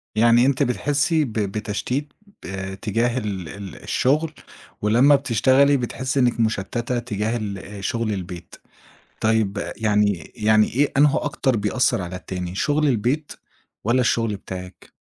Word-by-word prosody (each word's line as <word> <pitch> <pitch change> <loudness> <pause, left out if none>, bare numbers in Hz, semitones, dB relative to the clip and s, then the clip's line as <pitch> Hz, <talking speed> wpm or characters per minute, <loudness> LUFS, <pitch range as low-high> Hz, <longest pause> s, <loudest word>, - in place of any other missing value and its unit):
يعني 120 +2 +5
أنتِ 140 0 +2
بتحسّي 145 +5 +1
ب 115 - -7
بتشتيت 110 +7 -2 0.3
آآ 95 +1 -5
تجاه 115 +4 -1
ال 95 -8 -4
ال 100 -4 -8
الشغل 150 +4 +1 0.5
ولما 120 +7 +5
بتشتغلي 135 +2 +3
بتحسّي 130 +2 -2
إنِك 120 -2 +2
مُشتّتة 115 +3 -1
تجاه 110 -1 -2
ال 100 -3 -4
آآ، 100 +1 -9
شغل 115 -2 -1
البيت. 90 -2 -7 0.7
طيب 110 -2 +1 0.2
يعني 105 -4 +1
يعني 110 0 +4
إيه 140 +2 +2
أنهو 145 0 +5
أكتر 135 -4 0
بيأثّر 105 -1 +1
على 90 +1 -6
التاني، 90 -1 -5
شغل 145 +7 +1
البيت 130 +6 0 0.5
والّا 120 +3 +3
الشغل 115 -3 +1
بتاعِك؟ 90 -1 -9
115 Hz, 135 wpm, -22 LUFS, 100-130 Hz, 0.7 s, يعني